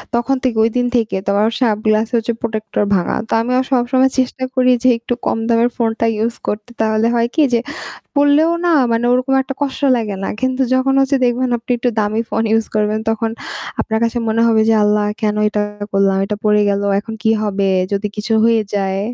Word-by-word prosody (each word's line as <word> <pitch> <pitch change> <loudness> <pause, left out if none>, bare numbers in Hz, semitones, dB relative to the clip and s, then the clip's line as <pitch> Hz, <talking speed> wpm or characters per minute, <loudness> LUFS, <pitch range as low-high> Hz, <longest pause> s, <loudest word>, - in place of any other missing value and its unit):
তখন 240 +3 +1
থেকে 245 -4 0
ঐদিন 245 +2 0
থেকে 225 -4 0
ত - - +2
ওর 220 +2 +2
সব 225 -4 +3
গ্লাস 215 +1 +2
হচ্ছে 235 0 0
protector 215 -2 -2
ভাঙা। 175 - 0
তো - - -3
আমিও 250 +2 +1
সবসময় 260 +1 +2
চেষ্টা 260 0 -1
করি 255 0 +3
যে - - +3
একটু 240 +1 -3
কম - - 0
দামের 235 +1 +3
ফোনটা 230 -1 0
ইউজ 230 +2 -1
করতে। 210 +2 -3
তাহলে 220 +1 +1
হয় 235 0 +2
কি? 315 - +3
যে - - +5 0.6
পড়লেও 290 +3 +4 0.2
না 340 - +3 0.2
মানে 230 +1 0
ওরকম 255 +2 +1
একটা 270 +1 -6
কষ্ট 280 0 -3 0.2
লাগে 215 -4 -3
না। - - -2
কিন্তু 260 +1 0
যখন 265 +1 +1
হচ্ছে 270 +1 +2
দেখবেন 250 +1 +1
আপনি 235 - -17
একটু 245 +1 0
দামি 215 +2 0
ফোন 225 - 0
ইউজ 225 0 +2
করবেন 215 0 +1
তখন 225 0 -1 0.5
আপনার 220 -1 -1
কাছে 230 +1 -1
মনে 220 +1 +1
হবে 225 -1 +3
যে 225 - +4
"আল্লাহ 210 0 +2 0.2
কেন 210 -1 +1
এটা 210 0 -2 0.3
করলাম? 195 -1 +2
এটা 210 +1 -3
পড়ে 210 0 +3
গেলো। 200 0 -1
এখন 220 +1 -8
কি 220 - +3
হবে? 210 -2 -1 0.4
যদি 200 +1 -1
কিছু 215 +2 -1
হয়ে 230 -1 +3
যায়।" 195 -1 -1
230 Hz, 205 wpm, -17 LUFS, 215-250 Hz, 0.6 s, যে